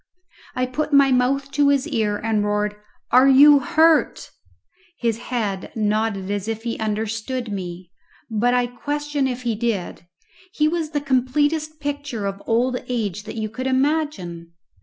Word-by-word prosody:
I 255 Hz, -, +1 dB
put 295 Hz, +5 st, -3 dB
my 280 Hz, -1 st, +5 dB
mouth 270 Hz, +2 st, +1 dB
to 290 Hz, -1 st, +3 dB
his 280 Hz, +1 st, +2 dB
ear 220 Hz, -8 st, 0 dB
and 220 Hz, -1 st, 0 dB
roared, 210 Hz, 0 st, -1 dB, 0.4 s
"Are 255 Hz, +2 st, +6 dB
you 285 Hz, +2 st, +8 dB
hurt?" 325 Hz, +1 st, +2 dB, 0.7 s
His 230 Hz, -2 st, -1 dB
head 220 Hz, -6 st, -3 dB
nodded 210 Hz, -2 st, -1 dB
as 205 Hz, 0 st, -3 dB
if 225 Hz, 0 st, -4 dB
he 235 Hz, -1 st, -3 dB
understood 220 Hz, +3 st, -3 dB
me, 180 Hz, -2 st, -6 dB, 0.4 s
but 240 Hz, +2 st, +1 dB
I 245 Hz, 0 st, +2 dB
question 290 Hz, +3 st, -2 dB
if 250 Hz, -1 st, -4 dB
he 235 Hz, -2 st, 0 dB
did. 210 Hz, -6 st, -3 dB, 0.5 s
He 300 Hz, -, +2 dB
was 325 Hz, -1 st, -1 dB
the 295 Hz, -2 st, -2 dB
completest 290 Hz, +4 st, 0 dB
picture 285 Hz, -7 st, -4 dB
of 195 Hz, 0 st, -4 dB
old 245 Hz, +2 st, +1 dB
age 210 Hz, -4 st, -2 dB
that 220 Hz, -, -7 dB
you 220 Hz, -1 st, -2 dB
could 255 Hz, +5 st, -5 dB
imagine. 260 Hz, -, -1 dB
245 Hz, 155 wpm, -22 LUFS, 215-285 Hz, 0.7 s, you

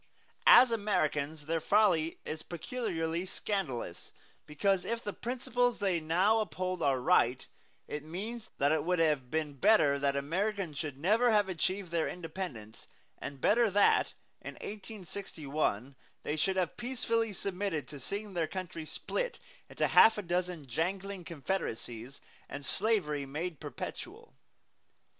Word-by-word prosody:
As 255 Hz, -1 st, +9 dB
Americans 160 Hz, -8 st, 0 dB
their 165 Hz, +1 st, -1 dB
folly 180 Hz, -6 st, +3 dB
is 155 Hz, 0 st, -4 dB
peculiarly 170 Hz, -4 st, -3 dB
scandalous, 160 Hz, -, -3 dB, 0.4 s
because 185 Hz, +5 st, +1 dB
if 235 Hz, 0 st, -3 dB
the 205 Hz, -, -3 dB
principles 245 Hz, 0 st, 0 dB
they 190 Hz, -4 st, +1 dB
now 180 Hz, +8 st, +3 dB
uphold 185 Hz, -3 st, -2 dB
are 135 Hz, -2 st, +2 dB
right, 125 Hz, 0 st, +3 dB, 0.4 s
it 150 Hz, 0 st, -5 dB
means 215 Hz, +8 st, -6 dB
that 140 Hz, +1 st, +3 dB
it 155 Hz, -2 st, +2 dB
would 180 Hz, +2 st, +1 dB
have 150 Hz, -6 st, +2 dB
been 155 Hz, -1 st, -1 dB
better 140 Hz, -, +4 dB
that 140 Hz, 0 st, +1 dB
Americans 175 Hz, +2 st, -1 dB
should 145 Hz, -4 st, -4 dB
never 215 Hz, -, +3 dB
have 210 Hz, -3 st, +4 dB
achieved 185 Hz, +1 st, -2 dB
their 165 Hz, -2 st, +1 dB
independence, 160 Hz, -, -7 dB, 0.3 s
and 140 Hz, -1 st, -6 dB
better 230 Hz, +1 st, +4 dB
that, 200 Hz, +1 st, +3 dB, 0.3 s
in -, -, -7 dB
1861, 165 Hz, -, -4 dB, 0.3 s
they 150 Hz, -, -1 dB
should 190 Hz, +5 st, +1 dB
have 185 Hz, -3 st, -1 dB
peacefully 235 Hz, -2 st, 0 dB
submitted 185 Hz, -7 st, -3 dB
to 145 Hz, -, -9 dB
seeing 200 Hz, +9 st, -4 dB
their 165 Hz, -3 st, 0 dB
country 180 Hz, -3 st, -5 dB
split -, -, -3 dB, 0.3 s
into -, -, 0 dB
half 220 Hz, -1 st, +7 dB
a 210 Hz, -, -3 dB
dozen 175 Hz, -3 st, -2 dB
jangling 185 Hz, +8 st, -2 dB
confederacies 140 Hz, -7 st, -4 dB, 0.3 s
and 140 Hz, 0 st, -6 dB
slavery 150 Hz, -12 st, +1 dB
made 155 Hz, +3 st, -4 dB
perpetual. -, -, -7 dB
175 Hz, 135 wpm, -32 LUFS, 150-205 Hz, 0.4 s, As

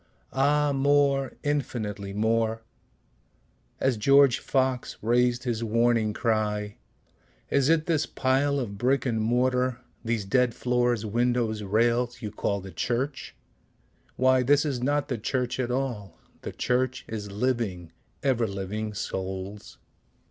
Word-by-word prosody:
Ah 145 Hz, +2 st, +2 dB
more, 140 Hz, -1 st, +2 dB
infinitely 110 Hz, -9 st, -2 dB
more; 110 Hz, +2 st, 0 dB, 1.2 s
(As 130 Hz, -3 st, +1 dB
George 140 Hz, +3 st, +5 dB
Fox 130 Hz, -2 st, -1 dB
rais'd 120 Hz, +2 st, +2 dB
his 120 Hz, -3 st, -2 dB
warning 115 Hz, -1 st, +2 dB
cry, 105 Hz, -1 st, -1 dB, 0.7 s
"Is 140 Hz, 0 st, +3 dB
it 160 Hz, -1 st, +3 dB
this 155 Hz, -3 st, +1 dB
pile 140 Hz, +2 st, +1 dB
of 100 Hz, -6 st, -5 dB
brick 130 Hz, +2 st, +1 dB
and 115 Hz, -3 st, 0 dB
mortar, 125 Hz, +2 st, +1 dB, 0.3 s
these 115 Hz, -3 st, -1 dB
dead 125 Hz, +2 st, +2 dB
floors, 120 Hz, -2 st, 0 dB
windows, 120 Hz, 0 st, 0 dB
rails, 120 Hz, +4 st, +1 dB
you 105 Hz, -2 st, -5 dB
call 100 Hz, -1 st, -2 dB
the 95 Hz, 0 st, -9 dB
church? 130 Hz, -, -3 dB, 0.8 s
Why 130 Hz, 0 st, +4 dB
this 145 Hz, +4 st, +3 dB
is 135 Hz, -5 st, -2 dB
not 145 Hz, +2 st, 0 dB
the 125 Hz, -6 st, -3 dB
church 125 Hz, +3 st, -2 dB
at 125 Hz, -2 st, -1 dB
all 120 Hz, -8 st, -3 dB, 0.2 s
the -, -, -5 dB
church 130 Hz, +1 st, -1 dB
is 105 Hz, -2 st, -6 dB
living, 105 Hz, -7 st, -2 dB, 0.3 s
ever 120 Hz, -4 st, +2 dB
living 105 Hz, +2 st, -4 dB
souls.") 95 Hz, 0 st, -5 dB
120 Hz, 125 wpm, -26 LUFS, 110-130 Hz, 1.2 s, George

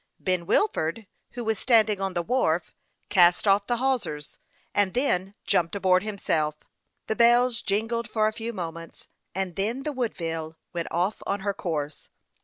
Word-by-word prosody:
Ben 180 Hz, -2 st, -1 dB
Wilford, 215 Hz, -, +1 dB, 0.3 s
who 240 Hz, -, -4 dB
was 220 Hz, -1 st, 0 dB
standing 220 Hz, -5 st, +3 dB
on 195 Hz, -1 st, -2 dB
the 175 Hz, -, 0 dB
wharf, 170 Hz, -7 st, 0 dB, 0.4 s
cast 180 Hz, -2 st, +5 dB
off 200 Hz, +1 st, +4 dB
the 240 Hz, -, +1 dB
hawsers, 240 Hz, -, -2 dB, 0.3 s
and 200 Hz, -1 st, +1 dB
then 195 Hz, -7 st, +1 dB
jumped 170 Hz, +2 st, +1 dB
aboard 185 Hz, -2 st, +3 dB
himself. 165 Hz, -7 st, -1 dB, 0.5 s
The 220 Hz, -, -1 dB
bells 240 Hz, +1 st, +4 dB
jingled 220 Hz, +3 st, -1 dB
for 215 Hz, -1 st, +2 dB
a 215 Hz, -, -1 dB
few 230 Hz, +1 st, -4 dB
moments, 165 Hz, -5 st, -7 dB, 0.3 s
and 190 Hz, -2 st, -2 dB
then 225 Hz, +7 st, -1 dB
the 300 Hz, -, -2 dB
Woodville 165 Hz, -, -3 dB, 0.2 s
went 170 Hz, -1 st, -3 dB
off 180 Hz, +5 st, -1 dB
on 200 Hz, 0 st, -1 dB
her 200 Hz, 0 st, -1 dB
course. 150 Hz, -6 st, -4 dB
200 Hz, 160 wpm, -26 LUFS, 175-230 Hz, 0.5 s, cast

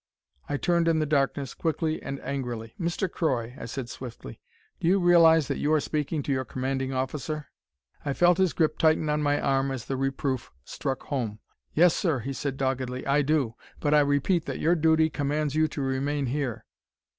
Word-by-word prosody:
I 145 Hz, -, 0 dB
turned 170 Hz, +2 st, +1 dB
in 165 Hz, -1 st, +3 dB
the 155 Hz, -, +1 dB
darkness, 140 Hz, -2 st, 0 dB
quickly 160 Hz, -1 st, -1 dB
and 140 Hz, 0 st, -5 dB
angrily. 120 Hz, -4 st, -4 dB
"Mr. 175 Hz, +2 st, -1 dB
Croy," 125 Hz, -9 st, -1 dB
I -, -, -6 dB
said 120 Hz, +1 st, -5 dB
swiftly, 120 Hz, -, -9 dB, 0.4 s
"do -, -, -1 dB
you 190 Hz, +3 st, +4 dB
realize 165 Hz, -4 st, +6 dB
that -, -, -2 dB
you 150 Hz, -, +1 dB
are 155 Hz, -, +4 dB
speaking 150 Hz, +1 st, -2 dB
to -, -, -2 dB
your 130 Hz, -1 st, +1 dB
commanding 130 Hz, +1 st, -2 dB
officer?" 140 Hz, +3 st, -3 dB, 0.5 s
I 140 Hz, -, -1 dB
felt 175 Hz, +4 st, +4 dB
his 185 Hz, -6 st, +3 dB
grip 155 Hz, +3 st, +1 dB
tighten 155 Hz, -1 st, +3 dB
on 150 Hz, 0 st, +1 dB
my 145 Hz, 0 st, +2 dB
arm 135 Hz, 0 st, +1 dB
as 130 Hz, -3 st, -4 dB
the 135 Hz, -, -3 dB
reproof 135 Hz, -1 st, -2 dB
struck 135 Hz, -1 st, -4 dB
home. 120 Hz, -7 st, -3 dB, 0.4 s
"Yes, 170 Hz, +1 st, +5 dB
sir," 165 Hz, -7 st, +1 dB
he 135 Hz, +4 st, -4 dB
said 135 Hz, 0 st, -3 dB
doggedly. 130 Hz, -1 st, -2 dB
"I 140 Hz, +1 st, +3 dB
do. 140 Hz, -5 st, +1 dB, 0.3 s
But 145 Hz, -1 st, +1 dB
I 150 Hz, -, +7 dB
repeat 145 Hz, +4 st, +2 dB
that -, -, -4 dB
your 165 Hz, -, +3 dB
duty 160 Hz, -1 st, +4 dB
commands 145 Hz, 0 st, -1 dB
you 155 Hz, +1 st, +3 dB
to 150 Hz, -, -5 dB
remain 135 Hz, +2 st, -1 dB
here." 130 Hz, -2 st, -3 dB
145 Hz, 190 wpm, -27 LUFS, 130-155 Hz, 0.5 s, I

